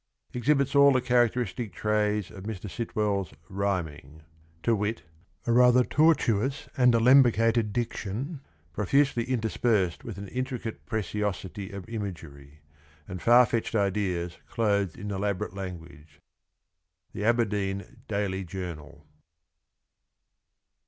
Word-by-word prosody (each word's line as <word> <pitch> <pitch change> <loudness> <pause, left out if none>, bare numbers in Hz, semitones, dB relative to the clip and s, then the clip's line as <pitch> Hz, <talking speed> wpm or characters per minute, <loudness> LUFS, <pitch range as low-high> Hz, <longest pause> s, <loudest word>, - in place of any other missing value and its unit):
] - - -38
Exhibits 140 +2 +1
all 140 0 +7
the 130 - +3
characteristic 120 -3 0
traits 105 -2 0
of 95 0 -10
Mr. 105 -2 -5
Sitwell's 100 - -2
rhyming 80 -7 -3 0.2
(!); 80 0 -33
to 115 - +3
wit, 105 +2 -2 0.4
a 120 - 0
rather 125 +1 +6
tortuous 135 -4 +2
and 125 -3 +4
alembicated 115 -2 +4
diction, 120 - -4 0.3
profusely 125 +4 +2
interspersed 110 -6 0
with 110 -4 -7
an 100 0 -7
intricate 125 -2 -5
preciosity 105 -2 -3
of 100 0 -8
imagery, 80 -10 -7 0.5
and 90 - -7
far 120 +1 +6
fetched 115 0 -2
ideas 95 -4 -1
clothed 100 -6 0
in 105 +2 -5
elaborate 100 -2 -2
language.— 85 -5 -9 0.9
The 105 - -4
Aberdeen 105 -4 0
Daily 100 -2 -2
Journal. 85 -5 -8
105 Hz, 110 wpm, -27 LUFS, 95-120 Hz, 0.9 s, all